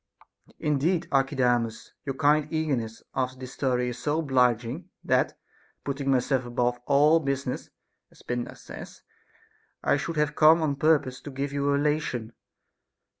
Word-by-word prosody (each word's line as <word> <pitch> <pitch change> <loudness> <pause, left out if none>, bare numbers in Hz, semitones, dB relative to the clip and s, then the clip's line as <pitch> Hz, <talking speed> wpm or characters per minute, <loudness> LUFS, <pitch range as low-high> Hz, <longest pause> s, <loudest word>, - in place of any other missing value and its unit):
Caphisias. - - -23
Indeed 160 +4 +1
Archidamus, 125 -4 +1
your 135 -2 -3
kind 150 +1 +3
eagerness 135 -9 -2
after 130 -1 -2
this 130 0 -8
story 125 -2 0
is 125 0 -6
so 145 +4 0
obliging, 125 -6 +1
that, - - +1 0.5
putting 140 0 -2
myself 130 0 +2
above 120 0 0
all 150 +3 +5
business 140 -3 -3 0.4
(as - - -20
Pindar 120 0 -3
says), - - -11 0.8
I - - +3
should 165 +3 -4
have 150 -1 +1
come 160 +2 +6
on 140 -3 0
purpose 140 -4 +2
to - - -8
give 140 +1 -4
you 140 0 0
a - - +3
relation. 140 -6 -1
140 Hz, 145 wpm, -27 LUFS, 125-150 Hz, 0.8 s, come